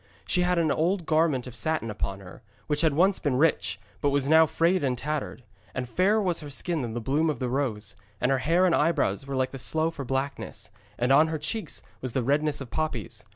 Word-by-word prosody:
She 180 - +1
had 180 0 +2
an 160 -3 +2
old 175 +2 0
garment 155 -5 +2
of 125 -2 -9
satin 120 -2 -1
upon 100 -1 -4
her, 90 -1 -12 0.2
which 150 -1 0
had 160 -4 +2
once 190 +4 +3
been 145 -5 0
rich, 155 +4 +1 0.2
but 145 - +2
was 140 -1 0
now 160 +1 +6
frayed 170 +3 +1
and 130 -2 0
tattered; 145 -1 -4 0.3
and 125 -1 -3
fairer 190 - +2
was 180 -5 0
her 150 - -8
skin 160 +3 -2
than 115 -2 -4
the - - -1
bloom 145 +7 +1
of 150 - -1
the 125 0 -2
rose, 120 -6 -2 0.2
and 125 - +1
her 135 - +2
hair 170 +7 +3
and 180 - +3
eyebrows 145 - +1
were 140 - -3
like 130 0 0
the 135 - -7
sloe 160 +4 +1
for 145 -4 -6
blackness, 130 -5 -4 0.3
and 125 +2 +1
on 150 +4 +6
her 160 0 -2
cheeks 205 +9 -3 0.2
was 130 -3 -3
the 130 - 0
redness 145 +3 +1
of 130 - -8
poppies. 120 -8 -3
145 Hz, 230 wpm, -27 LUFS, 125-160 Hz, 0.3 s, now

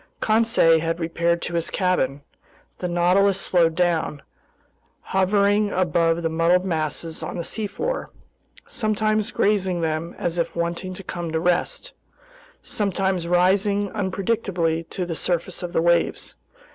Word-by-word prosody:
Conseil 220 -7 +4
had 165 +1 -2
repaired 170 +1 0
to 170 - -4
his 170 -1 -1
cabin. 145 -7 0 0.6
The 180 - -2
Nautilus 180 +3 +3
slowed 165 -4 +2
down, 165 -4 0 0.8
hovering 200 +2 +2
above 170 -2 +1
the - - +2
muddled 165 +3 +2
masses 160 -1 -2
on - - -5
the 170 - -3
seafloor, 225 - -3 0.6
sometimes 215 0 0
grazing 190 -6 +1
them 160 +1 -2
as 175 0 -2
if 170 - -2
wanting 170 +2 -3
to 195 - -9
come 175 -2 -5
to 160 - +1
rest, 180 - 0 0.7
sometimes 190 -3 -1
rising 195 +3 +2
unpredictably 190 -5 -1
to 185 - -3
the 170 - -4
surface 170 +1 -2
of 175 -1 -4
the 165 - +1
waves. 170 0 +1
175 Hz, 135 wpm, -23 LUFS, 165-195 Hz, 0.8 s, Conseil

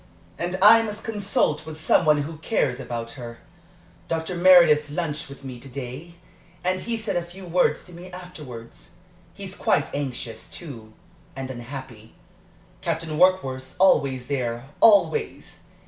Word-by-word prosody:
"And 175 +1 -2
I 225 +2 +9
must 215 -1 -5
consult 200 -8 0
with 155 0 -9
some 160 - +3
one 150 -1 +4
who 155 +2 -7
cares 135 - 0
about 115 -3 -5
her. 115 -2 -9 0.7
Dr. 165 +2 -2
Meredith 170 -5 +6
lunched 150 -2 -3
with 140 0 -12
me 130 -2 -7
to 135 - -12
day, 135 +6 -7 0.5
and 185 +1 0
he 230 +4 -3
said 220 -1 -3
a 175 - +1
few 175 +2 -11
words 175 +1 +2
to 180 - -12
me 180 +2 -10
afterwards. 145 - -10 0.4
He's - - -7
quite - - +1
anxious, 125 -5 -5
too 115 -10 -9 0.4
and 135 0 -5
unhappy. 120 -3 -9 0.7
Captain 160 -1 -2
Warkworth's 135 -9 +2
always 135 -9 +3
there 125 -2 -3
always! 230 - +3
150 Hz, 145 wpm, -24 LUFS, 130-180 Hz, 0.7 s, I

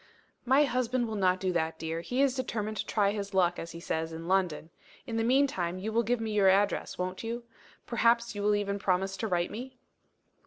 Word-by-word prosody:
"My 265 +4 +5
husband 250 -2 0
will 220 - -4
not 185 -2 +2
do 185 -1 -1
that, 160 -1 -1
dear. 165 +1 -3
He 250 +10 0
is 275 -2 +3
determined 220 -5 -3
to - - -2
try 200 -2 +2
his 200 -1 -5
luck, 175 -2 +3
as 165 - -6
he 170 - -7
says, 160 -1 -2
in 165 +1 -7
London. 180 -4 0 0.3
In 230 -3 -3
the 225 - +1
meantime 230 -9 +2
you 215 +4 -4
will 230 - +3
give 240 +1 0
me 225 -1 -3
your 200 -2 +4
address, 200 +2 +1
won't 185 +2 -3
you? 235 +1 -4 0.4
Perhaps 235 0 +2
you 205 - -4
will 210 +1 +3
even 200 -1 -1
promise 195 0 0
to 220 - -2
write 175 -3 0
to - - -13
me?" 255 +4 -7
205 Hz, 225 wpm, -30 LUFS, 180-235 Hz, 0.4 s, My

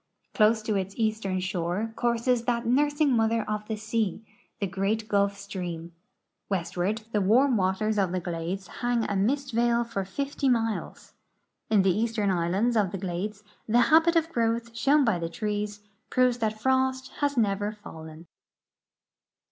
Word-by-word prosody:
Close 220 0 +3
to 215 -1 -1
its 195 0 -2
eastern 215 -4 0
shore 185 +3 -2
courses 235 0 +1
that 235 -1 0
nursing 290 +2 +2
mother 225 0 +1
of 210 0 -3
the 220 - -2
sea, 220 -1 -2 0.3
the 200 - 0
great 195 +4 -1
Gulf 200 -1 +1
stream. 175 -4 -6 0.6
M'estward 195 +3 -1
the 210 - +1
warm 245 +7 +4
waters 205 +2 +1
of 190 -3 +1
the 185 - -1
glades 175 +2 -4 0.2
hang 240 -1 +1
a 205 - -2
mist 270 +7 0
veil 235 +1 +2
for 200 -4 -3
50 275 +7 -2
miles. 225 -3 -2 0.6
In 210 -3 +4
the 185 -2 +3
eastern 220 -2 0
islands 190 +7 +1
of 205 -4 +2
the 195 - -4
glades 195 +3 -4 0.2
the 230 +2 +4
habit 330 +2 +6
of 325 -1 +2
growth 230 -1 -1
shown 280 +4 +3
by 215 -7 +1
the 165 0 -3
trees 210 +2 -3 0.3
proves 250 -1 +2
that 215 -1 -1
frost 260 +1 +1
has 285 -2 0
never 205 -2 +1
fallen. 160 -6 -11
215 Hz, 155 wpm, -27 LUFS, 195-235 Hz, 0.6 s, habit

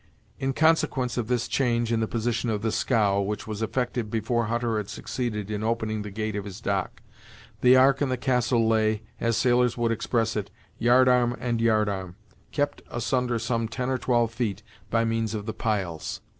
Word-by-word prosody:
In 135 0 -1
consequence 155 -5 +2
of 120 -3 -2
this 125 -1 0
change 120 -3 +1
in 115 - +2
the 110 - 0
position 115 +1 -1
of 105 -1 -1
the 110 - +1
scow, 105 -6 +2
which 105 +2 -3
was 110 -1 -5
effected 120 0 -1
before 115 +2 0
Hutter 115 0 -1
had 105 -2 -3
succeeded 110 -5 -4
in 105 0 -3
opening 110 -1 -1
the 105 - -6
gate 110 +1 -3
of 105 - -2
his 100 0 -8
dock, 100 -5 -2 0.6
the 125 +1 +6
Ark 135 +2 +5
and 140 -2 +1
the 130 - 0
Castle 120 -2 +1
lay, 110 -1 +2 0.2
as 115 -1 +1
sailors 125 -1 +3
would 120 -1 +1
express 115 0 0
it, 100 -2 -3 0.3
yard 125 +3 +5
arm 125 -1 +3
and 120 -2 -1
yard 110 -2 +3
arm, 95 -3 -4 0.4
kept 145 -1 -1
asunder 120 0 0
some 115 0 -1
ten 125 +3 -3
or 130 - 0
twelve 120 -2 +1
feet 110 -4 -2 0.3
by 115 0 +2
means 115 -1 -1
of 105 -1 -4
the 110 - -3
piles. 95 -8 -2
115 Hz, 195 wpm, -26 LUFS, 110-125 Hz, 0.6 s, the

